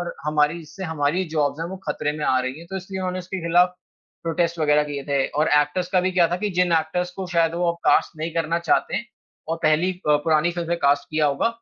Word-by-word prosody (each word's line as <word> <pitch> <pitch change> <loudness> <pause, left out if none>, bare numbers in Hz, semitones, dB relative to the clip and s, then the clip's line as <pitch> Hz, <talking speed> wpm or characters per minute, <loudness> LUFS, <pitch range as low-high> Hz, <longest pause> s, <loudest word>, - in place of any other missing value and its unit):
और 175 - -4
हमारी, 150 +2 +2
जिससे 175 +4 -9
हमारी 160 +2 0
जॉब्स 145 +1 0
हैं 165 - -2
वो 190 - -5
खतरे 150 0 -1
में 150 - -2
आ 130 - +3
रही 130 +3 -4
हैं 170 - -12
तो 190 - -3
इसलिए 190 0 -6
उन्होंने 185 0 -2
इसके 185 +1 -5
खिलाफ 180 +2 +4 0.5
प्रोटेस्ट 170 +1 -1
वग़ैरह 150 -1 +3
किए 145 -1 -5
थे 140 -1 +2
और 150 +2 0
एक्टर्स 160 +5 -2
का 185 - +4
भी 185 +1 0
क्या 175 -2 +4
था 175 - -1
कि 210 +2 -2
जिन 180 -1 +2
एक्टर्स 180 +3 -2
को 190 - -4
शायद 165 0 +3
वो 170 0 +1
कास्ट 160 - +3
नहीं 160 +1 -3
करना 165 0 0
चाहते 170 -2 +1
हैं 235 - -3 0.4
और 165 - -1
पहली 155 +4 +3
अ, 155 -5 +1
पुरानी 155 +2 +2
फ़िल्म 170 -1 -4
में 170 0 0
कास्ट 140 -2 +2
किया 155 -1 +2
होगा। 140 +10 +1
165 Hz, 245 wpm, -23 LUFS, 150-180 Hz, 0.5 s, खिलाफ